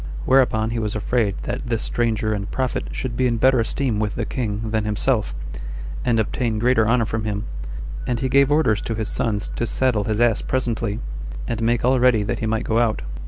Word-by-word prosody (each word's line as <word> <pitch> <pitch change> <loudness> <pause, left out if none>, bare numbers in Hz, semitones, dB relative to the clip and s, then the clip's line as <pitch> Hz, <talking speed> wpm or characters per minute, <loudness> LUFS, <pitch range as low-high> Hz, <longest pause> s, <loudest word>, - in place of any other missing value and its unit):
Whereupon 115 -4 +3
he 115 - -1
was 105 -1 -2
afraid 110 -1 +1
that - - -4
this 115 -2 -1
stranger 110 -2 0
and 100 0 -3
prophet 130 -2 -1
should 125 -3 -4
be 130 +1 +2
in 120 -1 0
better 130 +2 +4
esteem 115 0 0
with 105 -1 -1
the 115 - -2
king 110 -3 -3
than 110 -1 +1
himself, 105 +2 0 0.7
and 120 -2 +2
obtain 110 +1 0
greater 115 -1 +3
honor 115 0 +3
from 110 0 -2
him: 105 0 -2 0.6
and 120 -2 0
he 130 - 0
gave 140 +2 +4
orders 145 -9 +3
to 115 - -3
his 110 -1 -2
sons 105 -2 -1
to 120 - -1
saddle 115 -4 +1
his 110 0 -1
ass 120 -2 +3
presently, 115 -4 -1 0.5
and 115 - -2
make 120 +1 +1
all 130 +1 +4
ready 120 -4 +4
that 120 +2 -2
he 110 - -1
might 110 +1 0
go 115 -1 +1
out. 115 - +1
115 Hz, 210 wpm, -22 LUFS, 110-125 Hz, 0.7 s, better